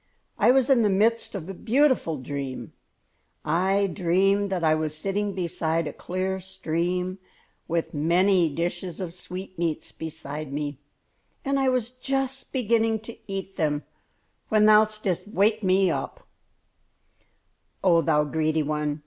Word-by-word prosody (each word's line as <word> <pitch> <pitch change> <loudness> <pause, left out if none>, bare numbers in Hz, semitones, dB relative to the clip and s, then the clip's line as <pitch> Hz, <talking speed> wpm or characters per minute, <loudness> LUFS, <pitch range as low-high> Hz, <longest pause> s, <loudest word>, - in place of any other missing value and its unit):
I - - +5
was 260 -1 +5
in 265 -4 +5
the 210 - +3
midst 220 +3 +1
of 175 -4 -5
a 195 - -5
beautiful 245 - +2
dream. 135 0 -5 0.7
I 190 +3 +2
dreamed 195 +2 +2
that 185 -3 -2
I 155 -1 +4
was 155 -1 -1
sitting 195 +3 -2
beside 165 -2 -1
a - - -4
clear 190 +1 -3
stream, 180 0 -2 0.5
with 165 0 -1
many 175 +3 +3
dishes 175 +3 -3
of 180 -3 -4
sweetmeats 180 -3 -4
beside 155 -2 -6
me, 145 -1 -4 0.7
and 275 0 +1
I 265 -1 +3
was 250 -2 0
just 270 +1 -2
beginning 225 -3 +1
to 225 +1 -9 0.2
eat 195 0 -5
them 150 -1 0 0.7
when 215 -1 +4
thou 215 0 +7
didst 205 -4 -3
wake 215 +1 +2
me." 190 -1 +3
"Oh, - - -2 1.9
thou 150 -1 +3
greedy 155 +1 0
one! 150 0 -2
185 Hz, 135 wpm, -25 LUFS, 160-210 Hz, 1.9 s, thou